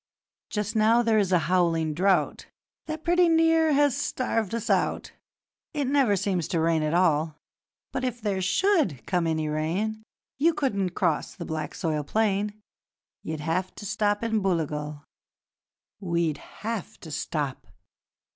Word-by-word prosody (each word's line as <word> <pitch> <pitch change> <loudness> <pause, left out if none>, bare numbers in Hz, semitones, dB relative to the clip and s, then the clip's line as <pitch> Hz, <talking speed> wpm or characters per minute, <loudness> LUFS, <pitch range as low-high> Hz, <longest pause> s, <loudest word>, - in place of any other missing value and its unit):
'Just 210 +1 -2
now 225 +2 +4
there 225 -2 +3
is 195 -3 +1
a 180 - +5
howling 165 -3 +2
drought 180 -1 +1 0.4
That 315 0 -5
pretty 350 0 +4
near 325 -1 +4
has 285 -2 +3
starved 225 -4 -1
us 230 - -4
out - - 0 0.6
It 290 -2 0
never 265 -6 +3
seems 185 -4 -1
to 170 - 0
rain 165 0 +2
at 155 +2 0
all; 160 -3 +2 0.6
But, - - -3
if 250 -2 -2
there 205 -4 -1
SHOULD 190 - +1
come 175 -3 0
any 160 -1 0
rain, 175 +9 -1 0.4
You 325 +3 +3
couldn't 200 - -1
cross 170 -6 0
the - - -6
black 155 -1 -4
soil 155 -4 -1
plain 210 +3 0 0.6
You'd 160 -1 -5
have 175 +4 -2
to 205 - -9
stop 205 +1 0
in 225 -2 +1
Booligal.'..... 150 -5 -2 1.0
'WE'D 170 -5 0
HAVE 225 -2 -6
TO 160 - -10
STOP!' 145 -2 -3
195 Hz, 145 wpm, -26 LUFS, 160-230 Hz, 1.0 s, a